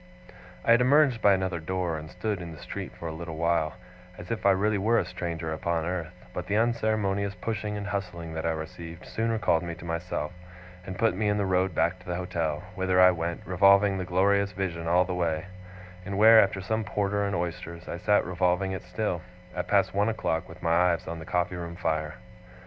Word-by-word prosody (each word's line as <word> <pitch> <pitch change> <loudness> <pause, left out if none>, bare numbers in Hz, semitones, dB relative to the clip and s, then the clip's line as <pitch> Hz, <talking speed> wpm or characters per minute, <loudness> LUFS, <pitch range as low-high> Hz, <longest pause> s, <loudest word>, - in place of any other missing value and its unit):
I - - +4
had 120 +1 +6
emerged 135 -2 +4
by 100 - +6
another 95 -2 -1
door, 90 0 -2
and 80 0 -7
stood 95 +2 -3
in 85 -1 -7
the - - -11
street - - -6
for 85 - -6
a 80 - -4
little 80 0 -6
while, 85 -1 +1 0.4
as 90 - -8
if 110 -3 0
I - - +7
really 100 +2 +2
were 115 +4 +3
a - - +2
stranger 85 -2 -4
upon 80 +1 -1
earth: 90 -1 -3 0.2
but 90 0 -5
the 105 - +1
unceremonious 110 -4 +1
pushing 105 +2 -3
and 100 - -5
hustling 90 -5 -4
that 80 0 -3
I - - +1
received, 80 +1 -6
soon 115 +1 -2
recalled 105 -7 +2
me 85 -1 -5
to 85 - -11
myself, 85 -2 -3 0.6
and 95 0 -5
put 115 -3 +3
me 105 +2 0
in 105 - +1
the 100 - +1
road 95 -2 +1
back 85 +3 +1
to 90 - -18
the 90 - -2
hotel; 85 -4 -2
whither 95 0 +1
I 90 0 +8
went, 85 -1 -3
revolving 100 +2 +4
the - - -2
glorious 100 +2 +2
vision 85 -3 -3
all 90 +2 +4
the 90 - -3
way; 80 -3 -1 0.6
and 100 +1 -4
where, 110 +1 +9
after 95 -1 0
some 110 +4 -1
porter 100 -1 -1
and 100 -1 -1
oysters, 85 0 -4
I - - -4
sat 105 +3 +3
revolving 90 +1 +1
it 95 - -4
still, 90 -1 -3 0.3
at 90 0 -3
past 95 -1 +2
one 100 +3 +2
o'clock, 90 -6 -2
with 85 +2 -12
my 85 +1 +4
eyes 85 - -4
on 85 0 -5
the 80 - -8
coffee 90 0 -1
room 85 -1 -6
fire. 80 -3 -2
90 Hz, 215 wpm, -27 LUFS, 85-100 Hz, 0.6 s, where